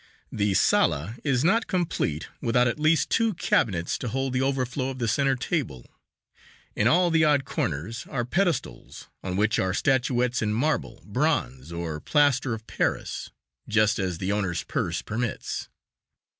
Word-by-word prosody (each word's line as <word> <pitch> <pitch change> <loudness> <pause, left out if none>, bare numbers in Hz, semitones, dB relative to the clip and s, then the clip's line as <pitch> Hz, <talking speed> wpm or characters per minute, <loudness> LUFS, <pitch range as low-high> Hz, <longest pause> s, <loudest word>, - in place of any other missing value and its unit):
The 100 -2 0
sala 95 +6 +2
is 135 -3 +1
not 220 +7 +3
complete 165 - -1
without 125 +1 +3
at 120 - -2
least 155 +1 +2
two 225 -3 +2
cabinets 90 - 0
to - - -4
hold 135 +2 -2
the 130 - +1
overflow 135 -1 -1
of 130 - -6
the 120 -2 -1
center 135 +4 +2
table. 125 - -3 0.9
In 105 - +2
all 175 +6 +4
the 160 -1 +4
odd 145 -3 +3
corners 90 - -3
are 120 -3 -2
pedestals 155 - -2
on 90 -1 -4
which 105 +2 +2
are 95 -1 0
statuettes 125 -2 +1
in 105 -1 0
marble, 150 +8 -1
bronze, 65 +5 -1
or 85 -2 -4
plaster 140 - +2
of 110 0 -11
Paris, - - -2 0.4
just 110 -1 +3
as 90 -3 -1
the 95 +3 -2
owner's 95 -4 -1
purse 85 0 -2
permits. 120 +2 -3
120 Hz, 155 wpm, -26 LUFS, 95-140 Hz, 0.9 s, all